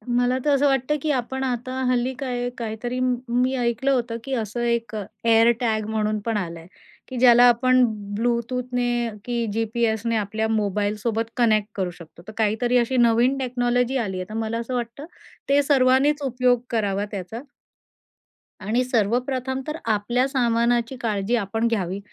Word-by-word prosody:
मला 245 +1 +2
तर 295 - +3
असं 280 +1 +2
वाटतं, 270 +1 +1
की 305 0 0
आपण 265 0 -2
आता 255 0 -3 0.2
हल्ली 250 +1 0
काय 245 -3 -2
काहीतरी 235 +2 -4
मी 250 0 0
ऐकलं 245 +2 0
होतं, 240 -3 0
की 270 - -5
असं 225 0 -3
एक 235 -2 -1 0.3
एअर 230 0 +5
टॅग 220 -3 0
म्हणून 215 -1 0
पण 225 -2 0
आला 170 -4 -4
आहे, 165 - -14 0.4
की 260 - -6
ज्याला 245 -1 +7
आपण 255 +1 +4 0.3
ब्लूटूथने 240 +1 -1 0.2
की 240 -1 -1
जी-पी-एसने 225 0 0
आपल्या 215 +1 -1
मोबाईलसोबत 210 +1 -1
कनेक्ट 215 -3 +3
करू 185 -3 -2
शकतो. 170 -1 -14
तर - - -7
काहीतरी 225 +3 +1
अशी 245 +2 +1
नवीन 240 +3 +3
टेक्नॉलॉजी 245 0 0
आली 200 -6 -2
आहे. 185 - -4
तर - - -8
मला 225 0 -2
असं 235 +2 -5
वाटतं 240 +4 -4 0.4
ते 285 +1 +5
सर्वांनीच 275 +1 +3
उपयोग 250 -2 +2
करावा 205 -3 0
त्याचा. 205 +5 -6 1.2
आणि 225 +6 0
सर्वप्रथम 255 +3 -1
तर 305 +1 -3
आपल्या 230 +4 +1
सामानाची 240 -1 +1
काळजी 215 0 0
आपण 225 +1 -1
घ्यावी 195 -4 -1
235 Hz, 155 wpm, -23 LUFS, 220-255 Hz, 1.2 s, ज्याला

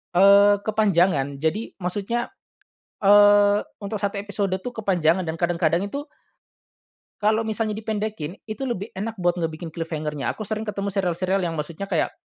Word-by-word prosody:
eee, 200 +2 +6
kepanjangan. 175 -10 +1
Jadi 160 +9 -2
maksudnya, 205 +6 -2 0.7
eee, 205 0 +6 0.2
untuk 205 +1 -4
1 200 0 -1
episode 200 -1 -2
tuh 250 - -4
kepanjangan 180 -3 +2
dan 160 0 -3
kadang-kadang 170 +1 +1
itu 285 +6 -6 1.1
kalau 215 +2 +2
misalnya 220 0 -1
dipendekin 215 -6 -4
itu 215 +5 -5
lebih 215 -2 -4
enak 220 +3 -4
buat 175 0 +1
ngebikin 160 0 -4
cliffhanger-nya, 155 -5 -4
aku 215 - -6
sering 215 +1 -3
ketemu 200 -1 -2
serial-serial 185 0 0
yang 165 -1 -2
maksudnya 160 +6 -5
kayak, 175 -5 0
195 Hz, 140 wpm, -23 LUFS, 170-210 Hz, 1.1 s, eee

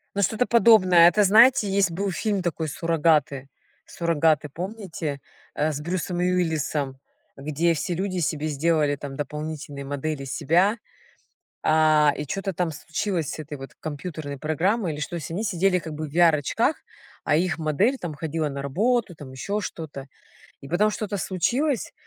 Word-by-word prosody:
Ну, 200 - 0
что-то 220 +6 +1
подобное. 185 -8 +6
Это 210 +3 +3
знаете, 225 +1 +6
есть 195 -2 +2
был 195 +4 -2
фильм 200 +1 -1
такой 160 -2 -2
"Суррогаты", 150 -4 +1 0.4
"Суррогаты", 160 -3 +1
помните, 175 -6 -5 0.3
э, 155 +1 0
с 145 - -5
Брюсом 175 +2 -3
Уиллисом, 160 -6 -1 0.4
где 155 +4 0
все 170 +3 -2
люди 185 +1 -2
себе 155 -1 -1
сделали 150 -1 +1
там 140 -1 -7
дополнительные 150 -1 -5
модели 145 0 -3
себя, 175 - +2 0.9
а, 155 -1 +4
и 150 - -4
чё-то 195 +5 -3
там 175 -1 -1
случилось 165 +1 -3
с - - -7
этой 150 -2 -7
вот 135 - -10
компьютерной 150 -2 -6
программой 170 - 0
или 145 - -7
что. 170 +3 -4
Они 185 +6 -3
сидели 185 -1 +2
как 165 -2 -7
бы 150 0 -5
в - - -15
VR-очках, 170 - +3 0.5
а 150 - +2
их 175 -1 0
модель, 190 - +1
там, 170 -4 -5
ходила 155 0 -2
на 140 0 -5
работу, 215 - 0
там, 145 -4 -11
ещё 200 +11 -3
что-то. 150 -7 -7 0.6
И 140 - -10
потом 190 +8 +2
что-то 210 -1 -4
случилось, 245 - -1
165 Hz, 155 wpm, -24 LUFS, 150-190 Hz, 0.9 s, подобное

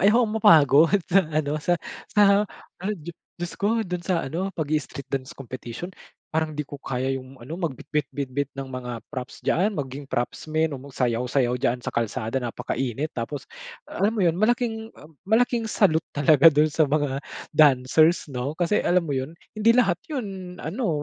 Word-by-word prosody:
ayokong 215 +2 +4
mapagod 160 +3 +6
sa 195 +2 +4
ano, 155 -2 -1
sa 175 +3 +2 0.3
sa 205 0 +5 0.4
ad 205 +2 -2
di 170 +1 -8 0.2
Diyos 175 0 -5
ko 225 +3 +2
do'n 180 -3 -4
sa 180 -3 +1
ano, 170 +8 -2
pag-i-street 150 -3 -3
dance 135 -1 -3
competition, 130 +5 -7 0.4
parang 160 -1 -1
di 150 - -2
ko 145 0 -10
kaya 130 0 -2
yung 130 +1 -12
ano, 155 +8 -6
magbitbit-bitbit 145 -3 -3
ng 135 -1 -6
mga 125 -1 -5 0.2
props 130 -3 -7
diyaan, 200 +4 +1
maging 140 -1 -5
propsmen 155 +6 -1
o 140 - -5
magsayaw-sayaw 125 -1 0
diyaan 125 0 0
sa - - -3
kalsada 115 +2 -1
napakainit 130 +3 -3
tapos 125 +4 -4 0.5
alam 210 +3 +1
mo 210 - 0
yun, 170 0 +2
malaking, 225 0 +1
um, 150 -1 -17
malaking 230 +1 +2
salute 165 -7 +2
talaga 145 +1 +5
do'n 155 0 +6
sa 155 +1 +3
mga 145 -2 0 0.3
dancers, 150 +3 +4
'no. 130 +3 -3
Kasi 175 +5 +1
alam 180 0 +2
mo, 160 - -6
’yun, 135 +5 -5 0.2
hindi 220 +2 +5
lahat 200 -9 +3
’yun, 195 - -6
ano, 165 - -1
155 Hz, 165 wpm, -25 LUFS, 135-185 Hz, 0.5 s, mapagod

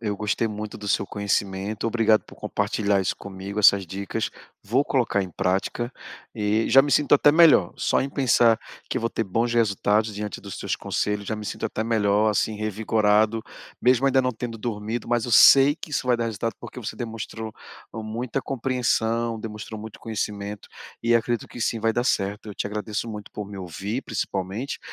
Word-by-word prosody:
Eu 105 -3 -2
gostei 110 +2 0
muito 105 0 -6
do 105 -1 -6
seu 100 - +1
conhecimento. 100 +1 -2
Obrigado 110 -2 +3
por - - -15
compartilhar 100 -2 0
isso 95 - -1
comigo, 100 +1 -6
essas 100 -2 +6
dicas. 95 +2 -3 0.3
Vou 130 +7 +1
colocar 120 -6 +1
em 95 - -6
prática 100 +8 -1 0.4
e 105 0 +1
já 135 +3 +7
me 145 - -2
sinto 145 0 +4
até 145 +1 +6
melhor, 155 - +6
só - - +1
em 135 - -2
pensar 120 -4 +4 0.3
que - - -1
eu - - -6
vou 115 - 0
ter - - -1
bons 115 +5 0
resultados 110 -1 +2
diante 105 -2 -5
dos - - -8
seus - - -2
conselhos, 105 -1 -2
já 110 - -2
me 105 -1 -7
sinto - - -3
até 110 0 -3
melhor, 105 -1 +2
assim, 105 +1 0
revigorado, 110 +1 +2 0.4
mesmo 130 +2 +4
ainda 135 -1 +4
não 125 0 0
tendo 115 0 -6
dormido, 110 0 -4
mas 120 0 +1
eu - - -4
sei 140 +5 +8
que 155 - -9
isso 135 - -1
vai 125 - +3
dar 115 - -1
resultado 115 +1 -3
porque 120 +1 -9
você 110 - -6
demonstrou 110 -2 -6 0.4
e 110 - -5
muita 120 +4 -3
compreensão, 115 -3 0
demonstrou 110 0 -7
muito 110 0 -10
conhecimento. 105 -2 -4 0.3
E 120 0 +3
acredito 115 0 0
que 120 - -10
sim, 115 - 0
vai 115 0 +2
dar 120 +2 0
certo. 105 -2 -1
Eu 100 - -7
te - - -3
agradeço 105 +2 -4
muito 105 -2 -7
por 105 -2 -5
me 100 -1 -9
ouvir, 95 - -4
principalmente, 100 +4 -3
110 Hz, 195 wpm, -24 LUFS, 105-120 Hz, 0.4 s, sei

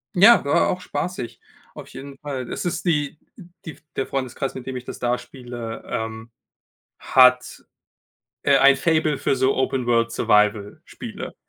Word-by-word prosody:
Ja, 215 +6 +7
war 140 - +2
auch 180 - -2
spaßig, 180 -8 -5 0.3
auf - - -10
jeden 140 0 -10
Fall. 135 -3 -5
Das - - -5
ist 175 0 -3
die, 150 -5 +1 0.3
äh 200 - -11 0.2
die 160 - -5
f - - -22
der 135 - -1
Freundeskreis, 135 0 -4
mit 130 -1 -8
dem 130 - -4
ich 125 - -5
das - - -8
da 120 0 0
spiele, 120 -4 -8
ähm, 110 +1 -5 0.7
hat, 125 -1 +4 0.8
äh, - - +4
ein 140 0 +6
Faible 155 -2 +1
für 135 - 0
so 130 +1 +2
Open-World-Survival-Spiele. 115 -5 0
130 Hz, 150 wpm, -22 LUFS, 120-145 Hz, 0.8 s, Ja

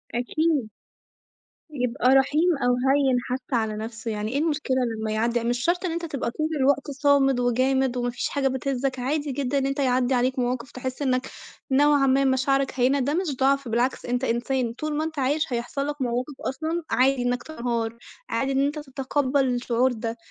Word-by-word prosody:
أكيد. 285 0 0 1.0
يبقى 250 -1 0
رحيم 305 +5 +3
أو 245 0 +3
هيِّن 265 +1 +2
حتى 255 +2 -4
على 220 -2 0
نَفْسه، 225 +1 -5
يعني 210 +1 -3
إيه 280 - 0
المشكلة 305 -4 0 0.2
لمّا 220 0 -2
يعدِّي 230 +2 +1
ع - - -5
مش 240 +1 0
شرط 350 +5 +1
إن 355 - -1
أنت 335 +1 -3
تبقى 280 -6 -3
طول 310 +5 -2
الوقت 275 +1 +2
صامد 275 -2 +3
وجامد، 255 +1 +1
وما 245 0 0
فيش 240 - -3
حاجة 280 -2 0
بتهزك، 265 0 -2
عادي 290 +3 -1
جدًا 275 0 -1
إن 270 - +1
أنت 275 +1 -2
يعدِّي 255 -1 +2
عليك 255 +1 +1
مواقف 245 0 -2
تحس 255 +2 -5
إنك 255 -1 0 0.4
نوعًا 285 0 +4
ما 270 +1 +3
مشاعرك 270 +1 +2
هيّنة، 265 +3 +3
ده 275 +2 0
مش 335 -4 -1
ضَعْف، 275 0 +2
بالعكس 240 +3 0
أنت 245 +1 -1
إنسان، 240 0 0
طول 305 +3 -3
ما 310 - 0
أنت 315 -2 -4
عايش 280 +2 0
هيحصل 260 +4 -2
لك 295 -1 -4
مواقف 250 +3 -1 0.2
أصلًا 320 +5 -3
عادي 265 0 +3
إنك 245 0 -1
تنهار، 235 -6 -3 0.3
عادي 275 0 0
إن 270 +1 +2
أنت 300 +1 -2
تتقبَّل 270 0 0
الشعور 245 0 +1
ده، 230 0 -4
265 Hz, 185 wpm, -25 LUFS, 245-280 Hz, 1.0 s, نوعًا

